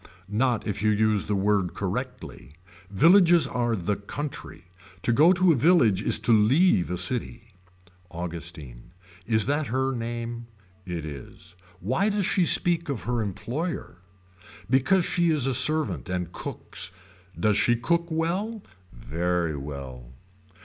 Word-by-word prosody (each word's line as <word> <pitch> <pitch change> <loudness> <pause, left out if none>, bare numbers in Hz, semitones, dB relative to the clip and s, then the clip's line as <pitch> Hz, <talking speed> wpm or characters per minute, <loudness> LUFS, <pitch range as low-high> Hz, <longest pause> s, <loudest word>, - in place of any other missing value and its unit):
Not 120 +2 0
if 100 -2 -3
you 110 - +2
use 105 -1 +1
the 105 - 0
word 95 -3 0
correctly. 100 - -6 0.3
Villages 170 - +5
are 120 -3 -1
the 100 +1 -2
country. 135 - -7 0.4
To 120 - +2
go 155 +8 +6
to 185 -1 +4
a - - +3
village 125 - +3
is - - +2
to 120 - +3
leave 110 - +3
a 90 - -2
city. 115 0 -3 0.6
Augustine. 85 -5 -7 0.3
Is 110 -2 +2
that 145 +1 0
her 130 +3 0
name. 120 0 -5 0.4
It 85 -3 -4
is. 80 +4 -10 0.3
Why 130 - +1
does 205 -2 0
she 180 -2 +2
speak 170 -2 +2
of 135 -5 -3
her 120 -1 -1
employer. 120 - -4 0.7
Because 135 - +2
she 175 -1 +1
is 150 -5 +1
a 135 - +1
servant 150 -2 +2
and 90 -2 -3
cooks. - - -5 0.5
Does 105 -1 +2
she 120 +3 +3
cook 170 +8 0
well. 185 +7 -2 0.3
Very 85 +5 -2
well. 70 -4 -8
115 Hz, 140 wpm, -25 LUFS, 90-150 Hz, 0.7 s, go